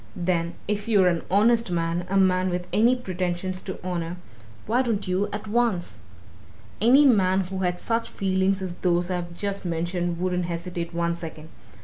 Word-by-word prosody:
Then, 170 -1 -1
if 210 +1 -2
you're 200 -5 +5
an 170 -1 0
honest 230 +3 +3
man, 170 0 -1
a 195 - +1
man 185 -1 +3
with 180 0 -2
any 235 +4 +4
pretensions 185 -4 -3
to 190 - -6
honour, 175 -1 -3 0.5
why 240 +4 +2
don't 220 -6 -1
you 185 +3 0
at 210 +1 -5
once! 205 - 0 0.8
Any 260 +6 +6
man 195 -7 +4
who 190 +1 -5
had 180 -1 -1
such 230 0 -1
feelings 190 0 0
as 180 -2 -4
those 175 0 +1
I've 175 -1 -3
just 200 +2 -3
mentioned 175 0 -2
wouldn't 180 -1 0
hesitate 170 0 -4
one 170 0 0
second. 160 -2 -9
185 Hz, 165 wpm, -25 LUFS, 175-200 Hz, 0.8 s, Any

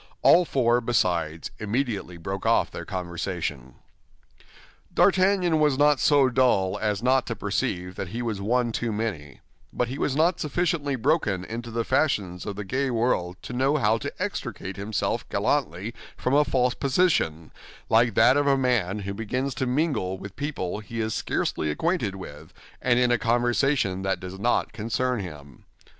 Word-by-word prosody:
All 175 +1 +6
four, 120 -4 +2
besides, 85 -9 0
immediately 105 -5 -2
broke 95 +4 -5
off - - +2
their - - -7
conversation. 85 -7 -4 1.2
D'Artagnan 185 -4 +3
was 150 -3 +3
not 145 0 +4
so 145 -3 +4
dull 120 -7 +2
as 105 0 -1
not 130 0 +3
to 115 - -2
perceive 90 -3 -2
that 95 - -4
he 115 +6 -4
was 110 -4 -3
one 120 +3 +1
too 115 0 -2
many; 100 -10 -4 0.3
but 120 - -1
he 135 +3 -5
was 135 - 0
not 165 +3 +2
sufficiently 150 -2 0
broken 120 - +1
into 115 +2 -6
the 115 0 -1
fashions 95 - 0
of 100 - -4
the 105 - -5
gay 130 +6 -1
world 110 -7 0
to - - -7
know 135 +4 +2
how 110 -3 +2
to 140 - -4
extricate 120 - -4
himself 100 +1 -2
gallantly 90 +9 -1 0.2
from 125 - -1
a 145 +1 +6
false 125 -3 +1
position, 135 - +1 0.4
like 115 -1 +3
that 130 +3 +5
of 145 0 +2
a 135 -1 +4
man 110 -7 0
who 100 0 -4
begins 125 +6 -2
to 130 - -2
mingle 125 - 0
with 100 +1 -9
people 140 -10 -3
he 115 +2 -7
is 110 -1 -1
scarcely 75 - -1
acquainted 115 - -1
with 95 - -10 0.3
and 120 -1 +3
in 125 -1 +3
a 120 - +3
conversation 120 -3 +1
that 95 0 -1
does 95 +1 -8
not 120 +2 +1
concern 115 +3 -1
him. 75 -8 -9
115 Hz, 165 wpm, -25 LUFS, 95-135 Hz, 1.2 s, All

